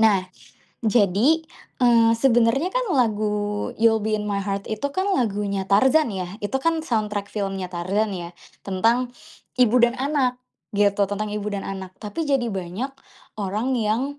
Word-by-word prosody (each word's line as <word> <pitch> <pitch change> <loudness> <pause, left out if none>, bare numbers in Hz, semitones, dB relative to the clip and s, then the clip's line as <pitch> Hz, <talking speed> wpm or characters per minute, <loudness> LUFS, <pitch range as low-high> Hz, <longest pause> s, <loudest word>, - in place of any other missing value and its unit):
Nah, 210 -4 +4 0.6
jadi 225 - +3 0.4
eee 230 -2 +5
sebenernya 240 +6 +3
kan - - 0
lagu 210 -4 0
"You'll 225 0 +4
Be 215 0 0
in 210 - -3
My 200 -1 0
Heart" 200 +1 -4
itu 220 +6 -2
kan 385 +2 0
lagunya 200 - -1
Tarzan 265 +9 +4
ya, 185 -2 -3
itu 205 +5 -4
kan 330 -1 +1
soundtrack 210 -4 -1
filmnya 195 -3 -3
Tarzan 195 +4 -1
ya, 170 -1 -6 0.3
tentang 230 +6 +1 0.5
ibu 245 -2 +4
dan 240 0 +4
anak 265 -3 0 0.3
gitu, 200 0 +2
tentang 210 +1 -2
ibu 210 -1 -4
dan 200 - -4
anak. 190 -1 -6
Tapi 215 +10 -4
jadi 270 -4 +1
banyak 195 +8 -4 0.5
orang 215 +7 -1
yang 240 +6 -1
215 Hz, 150 wpm, -23 LUFS, 200-250 Hz, 0.6 s, eee